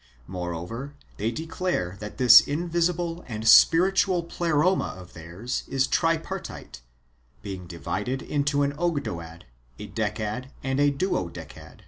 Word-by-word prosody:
Moreover, 90 - -6 0.2
they 110 +3 -1
declare 160 - -3
that 105 0 -8
this 120 -3 +9
invisible 170 +2 -1
and 110 -2 -4
spiritual 180 - +5
Pleroma 170 - 0
of 90 -1 -13
theirs 85 +10 -5
is 135 -1 +1
tripartite, 165 - -2 0.6
being 95 -4 -7
divided 125 +9 -4
into 145 0 0
an 140 0 0
Ogdoad, 90 - -3 0.3
a - - -8
Decad, 110 +4 -3
and 135 +1 -1
a 145 0 +4
Duodecad. 85 - -4
130 Hz, 115 wpm, -25 LUFS, -, 0.6 s, this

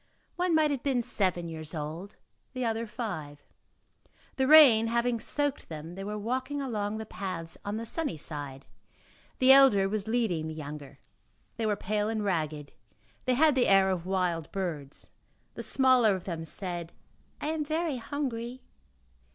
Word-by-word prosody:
One 360 -2 +1
might 310 -1 +3
have 275 -3 -2
been 255 -3 0
seven 185 -7 +1
years 160 0 -6
old, 160 +6 -6 0.4
the 255 -2 -2
other 225 0 -1
five. 160 - -6 0.9
The 265 -1 +2
rain 265 -8 +8
having 235 0 +1
soaked 290 +3 -2
them, 160 +1 -7
they 195 +2 -7
were 210 +1 -4
walking 260 +6 -2
along 215 -6 -2
the 220 - -5
paths 185 -6 -5
on 205 +1 -3
the 230 - -4
sunny 285 - -2
side; 145 -3 -7 0.7
the 260 +1 +6
elder 265 -8 +7
was 210 +1 -3
leading 220 -9 0
the 160 - -6
younger; 145 -2 -8 0.6
they 225 -2 -1
were 210 - +1
pale 210 +1 -1
and 220 -1 -2
ragged; 155 -6 -2 0.5
they 255 - +2
had 305 +3 +5
the 260 -2 +2
air 195 -1 +5
of 180 -1 -3
wild 180 -4 -1
birds. 160 -8 -5 0.4
The - - -6
smaller 255 -6 +4
of 185 - -6
them 165 -3 -5
said: 175 -1 -5 0.5
"I 300 - -3
am 315 -1 -1
very 310 -1 -1
hungry." 250 -1 -4
210 Hz, 160 wpm, -29 LUFS, 170-255 Hz, 0.9 s, rain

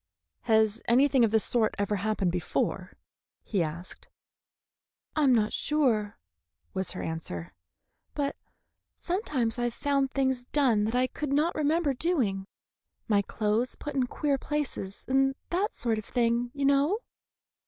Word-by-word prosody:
"Has 220 -1 +3
anything 260 +1 +4
of 225 - +4
the 220 +1 +3
sort 220 0 +2
ever 205 0 0
happened 200 -2 0
before?" 180 -1 -2 0.5
he 200 -5 -1
asked. 170 +3 -6 1.1
"I 310 - +1
am 260 -2 +5
not 215 -2 +1
sure," 230 -9 +1 0.6
was 190 0 -2
her 185 - -5
answer; 90 - -5 0.6
"but 285 -1 -1 0.6
sometimes 280 - -1
I've 240 -1 -1
found 275 -1 +1
things 265 -2 0
done 245 -7 +2
that 225 +3 -1
I 250 +1 +3
could 285 +2 -4
not 300 +4 +2
remember 305 0 +1
doing: 245 - 0 0.6
my 205 -2 +3
clothes 215 +4 -1
put 295 - -6
in 260 -2 +1
queer 280 +1 0
places, 275 -11 -4
and 270 0 +2 0.2
that 375 +4 0
sort 225 -3 +1
of 215 - -9
thing, 235 0 +1
you 280 -1 -1
know. 280 +8 +3
245 Hz, 145 wpm, -28 LUFS, 210-280 Hz, 1.1 s, am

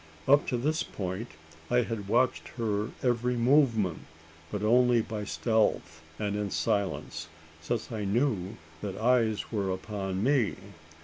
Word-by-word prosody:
Up 145 +2 +5
to 125 - 0
this 155 +6 0
point, 95 +4 -4 0.4
I 125 0 +3
had 110 -4 -4
watched 120 +4 +2
her 105 -2 -1
every 125 0 +1
movement. 120 - +3 0.5
But 105 0 -3
only 120 +1 +4
by 105 -2 -5
stealth 110 -7 0 0.2
and 105 -1 -2
in 105 -1 -1
silence: 95 -5 -1 0.3
since 115 +8 -3
I 110 -2 -3
knew 100 -2 0 0.2
that 100 -2 -4
eyes 115 -2 +2
were 100 -4 -1
upon 95 0 -3
me. 130 -5 +2
110 Hz, 135 wpm, -29 LUFS, 100-125 Hz, 0.5 s, Up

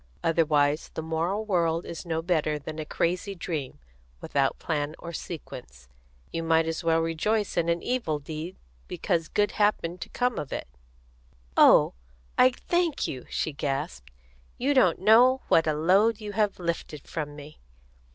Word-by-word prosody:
Otherwise 150 -3 +2
the - - -2
moral 170 +7 -1
world 170 -4 +1
is 170 +1 -7
no 160 -1 -1
better 155 -3 +1
than 155 +2 -7
a 155 - -4
crazy 180 +6 -1
dream, 155 - -4 0.4
without - - 0
plan 150 0 -2
or 170 0 -8
sequence. 60 - -8 0.5
You 165 - -1
might 165 0 +3
as 165 +2 -3
well 165 0 +3
rejoice 195 +6 0
in 170 -1 +1
an 170 0 0
evil 240 -12 -1
deed 155 +4 -7 0.3
because 165 -2 -1
good 205 0 +1
happened 185 -5 0
to - - -6
come 250 0 0
of 145 - -6
it." - - -4 0.9
"Oh, - - +6 0.4
I 255 - +6
thank 340 +5 -1
you!" 130 -2 -6
she 155 - -2
gasped. 135 - -3 0.5
"You 275 +4 +1
don't 220 -11 +4
know 240 +7 +5
what 165 -1 +4
a 155 - +2
load 195 +8 +3
you 210 -1 -6
have 205 0 0
lifted 170 -4 -4
from 150 -2 -5
me!" 150 +1 -12
165 Hz, 160 wpm, -27 LUFS, 155-205 Hz, 0.9 s, Oh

